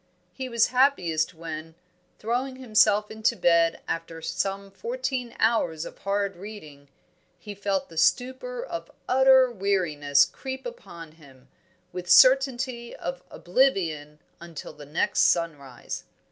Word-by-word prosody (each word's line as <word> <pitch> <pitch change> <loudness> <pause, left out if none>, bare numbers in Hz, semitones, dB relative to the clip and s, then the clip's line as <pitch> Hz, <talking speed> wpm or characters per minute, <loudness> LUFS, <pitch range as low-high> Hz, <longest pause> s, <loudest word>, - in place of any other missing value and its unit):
He 260 -1 -6
was 235 -1 +2
happiest 185 - +1
when, 160 0 -7 0.4
throwing 250 +4 -2
himself 215 -4 +2
into 220 0 0
bed 170 -1 +2
after 165 0 -4
some 195 +4 -3
fourteen 270 - -4
hours 175 -9 +1
of - - -11
hard 200 -1 -1
reading, 155 -8 -11 0.5
he 205 +4 -9
felt 200 -1 -2
the 165 - -14
stupor 260 - 0
of - - -6 0.2
utter 260 -1 +5
weariness 155 -9 +2
creep 265 - -7
upon 170 - -9
him, 140 -5 -19 0.4
with 180 -1 -6
certainty 255 -1 +4
of 175 0 -5
oblivion 175 - 0 0.2
until 170 -3 -9
the 145 -1 -13
next 150 +4 0
sunrise. 145 -7 0
195 Hz, 120 wpm, -26 LUFS, 165-250 Hz, 0.5 s, utter